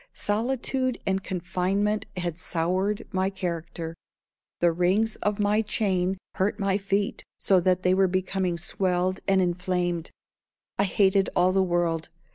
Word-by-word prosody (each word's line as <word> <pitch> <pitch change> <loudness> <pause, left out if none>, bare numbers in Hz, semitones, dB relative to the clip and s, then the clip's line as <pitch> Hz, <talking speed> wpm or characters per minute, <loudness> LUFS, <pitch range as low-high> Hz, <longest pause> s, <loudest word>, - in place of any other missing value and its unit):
Solitude 255 +3 0
and 190 0 0
confinement 190 +3 -1
had 175 -2 -3
soured 185 +5 -1
my 190 -1 +1
character. 170 -3 -4 0.7
The 175 -1 +4
rings 185 +6 +2
of 210 0 -1
my 210 +1 +2
chain 190 -3 0 0.2
hurt 200 +2 0
my 195 0 +1
feet 195 +1 -1 0.2
so 190 -2 +4
that 185 +1 +1
they 180 - +4
were 190 0 +4
becoming 185 -1 -1
swelled 185 +1 0
and 195 -1 +4
inflamed. 175 -1 -1 0.7
I 200 - +4
hated 195 0 +3
all 180 +1 +4
the 190 +1 +3
world. 175 -3 0
185 Hz, 135 wpm, -26 LUFS, 180-200 Hz, 0.7 s, The